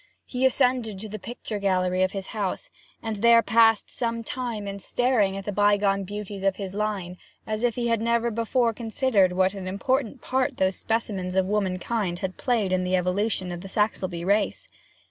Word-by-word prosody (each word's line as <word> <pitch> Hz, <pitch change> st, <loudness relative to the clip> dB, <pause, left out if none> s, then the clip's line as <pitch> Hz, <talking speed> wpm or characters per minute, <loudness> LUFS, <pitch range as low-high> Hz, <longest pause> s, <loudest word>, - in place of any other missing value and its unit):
He 255 Hz, +1 st, +2 dB
ascended 250 Hz, -5 st, +1 dB
to 215 Hz, +3 st, -7 dB
the 215 Hz, +1 st, -6 dB
picture 220 Hz, 0 st, -6 dB
gallery 185 Hz, -2 st, +1 dB
of 185 Hz, 0 st, +2 dB
his 195 Hz, -1 st, -5 dB
castle, 215 Hz, -, -3 dB, 0.3 s
and 220 Hz, -2 st, -3 dB
there 230 Hz, +2 st, +6 dB
passed 225 Hz, -1 st, +4 dB
some 230 Hz, -1 st, -2 dB
time 230 Hz, -4 st, -4 dB
in 200 Hz, 0 st, -5 dB
staring 215 Hz, -4 st, +1 dB
at 195 Hz, -, -6 dB
the 205 Hz, -, -2 dB
bygone 205 Hz, -1 st, +2 dB
beauties 205 Hz, 0 st, -6 dB
of 195 Hz, -1 st, +2 dB
his 195 Hz, -2 st, -6 dB
line 200 Hz, -4 st, -3 dB, 0.3 s
as 215 Hz, 0 st, -3 dB
if 240 Hz, -2 st, +1 dB
he 240 Hz, -1 st, -1 dB
had 230 Hz, -2 st, +1 dB
never 235 Hz, +1 st, +1 dB
before 230 Hz, +1 st, +1 dB
considered 225 Hz, -4 st, +2 dB
what 185 Hz, +1 st, +2 dB
an 195 Hz, -2 st, -6 dB
important 255 Hz, +7 st, -1 dB
part 260 Hz, +2 st, -1 dB
those 190 Hz, 0 st, +1 dB
specimens 200 Hz, -5 st, -2 dB
of 190 Hz, -1 st, +3 dB
womankind 195 Hz, -1 st, -1 dB
had 185 Hz, 0 st, -4 dB
played 230 Hz, -7 st, 0 dB
in 185 Hz, 0 st, +1 dB
the 180 Hz, 0 st, +1 dB
evolution 185 Hz, +1 st, 0 dB
of 175 Hz, 0 st, -6 dB
the 195 Hz, -, -8 dB
Saxelbye 185 Hz, -5 st, -1 dB
race. 200 Hz, +2 st, +1 dB
205 Hz, 185 wpm, -25 LUFS, 190-230 Hz, 0.3 s, there